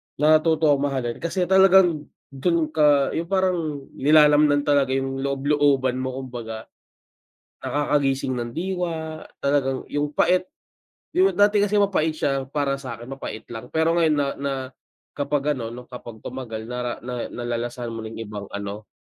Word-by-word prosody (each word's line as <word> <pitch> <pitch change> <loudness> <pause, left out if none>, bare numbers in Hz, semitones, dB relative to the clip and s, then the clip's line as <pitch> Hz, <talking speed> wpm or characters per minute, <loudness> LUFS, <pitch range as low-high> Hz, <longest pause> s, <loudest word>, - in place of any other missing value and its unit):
natuto 155 +1 +4
akong 145 0 +2
mahalin 125 -4 -3
kasi 180 +2 -1
talagang 190 -4 +5 0.2
dun 155 +3 0
ka 145 -3 +4
yung 165 +1 -3
parang 175 -6 0
nilalamnan 150 0 +5
talaga 140 -2 +2
yung 135 0 -2
loob 140 0 -2
looban 135 -3 +2
mo 130 0 -3
kumbaga. 115 -3 -7 1.0
Nakakagising 140 -3 0
ng 120 -1 -4
diwa, 165 -2 -3 0.2
talagang 135 -2 0
yung 145 0 -2
pait 180 +4 +3 0.7
yung 375 +2 +3
dati 205 +1 +4
kasi 205 0 +1
mapait 195 -6 +2
siya 135 -3 -1
para 140 0 -1
sa 130 -3 -6
'kin 120 +3 -11
mapait 135 -5 -6
lang, 115 +1 -7
pero 160 +5 +1
ngayon 160 -2 +3
na 145 -1 +1
na 140 0 -2 0.6
kapag 145 0 0
ano 115 -1 -5
'no 125 +1 -11
kapag 120 -3 -10
tumagal 115 -3 -6
nara 125 -1 -4
na 125 0 -4
nalalasahan 120 0 -4
mo 115 - -6
na 110 0 -7
yung 115 - -6
ibang 105 -1 -6
ano, 100 +1 -6
140 Hz, 155 wpm, -23 LUFS, 125-155 Hz, 1.0 s, talagang